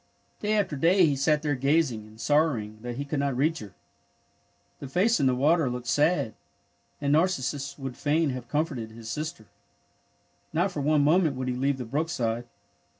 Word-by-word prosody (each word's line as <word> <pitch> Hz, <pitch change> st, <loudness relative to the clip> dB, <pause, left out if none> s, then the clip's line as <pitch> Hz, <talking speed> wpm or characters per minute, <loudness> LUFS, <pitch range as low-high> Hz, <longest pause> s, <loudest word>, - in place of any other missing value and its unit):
Day 210 Hz, 0 st, 0 dB
after 200 Hz, -7 st, +1 dB
day 175 Hz, +6 st, +4 dB
he 145 Hz, -3 st, +2 dB
sat 150 Hz, +3 st, +1 dB
there 150 Hz, -1 st, +1 dB
gazing, 135 Hz, -5 st, +1 dB
and 110 Hz, +1 st, -17 dB
sor 150 Hz, +5 st, +3 dB
rowing 105 Hz, -1 st, -7 dB
that 120 Hz, 0 st, -5 dB
he 140 Hz, -, -3 dB
could 145 Hz, 0 st, -2 dB
not 140 Hz, -3 st, -1 dB
reach 155 Hz, +4 st, +1 dB
her. 100 Hz, -6 st, -11 dB, 1.0 s
The 140 Hz, -, -7 dB
face 195 Hz, -, +2 dB
in 135 Hz, -, +3 dB
the 130 Hz, -, +2 dB
water 150 Hz, +2 st, +3 dB
looked 125 Hz, 0 st, -5 dB
sad, 150 Hz, -3 st, +2 dB, 0.7 s
and 145 Hz, 0 st, +1 dB
Narcissus 145 Hz, -4 st, 0 dB
would 135 Hz, -3 st, -6 dB
fain 150 Hz, +2 st, +1 dB
have 125 Hz, -2 st, -6 dB
comforted 145 Hz, -7 st, -2 dB
his 115 Hz, +1 st, -8 dB
sister. 150 Hz, -4 st, -5 dB, 1.1 s
Not 175 Hz, +5 st, +1 dB
for 150 Hz, -, -4 dB
one 150 Hz, 0 st, +3 dB
moment 160 Hz, -1 st, +3 dB
would 130 Hz, 0 st, -3 dB
he -, -, 0 dB
leave 135 Hz, +2 st, 0 dB
the 125 Hz, -, -5 dB
brook 150 Hz, +8 st, -1 dB
side. 120 Hz, -6 st, -2 dB
140 Hz, 190 wpm, -27 LUFS, 125-160 Hz, 1.1 s, day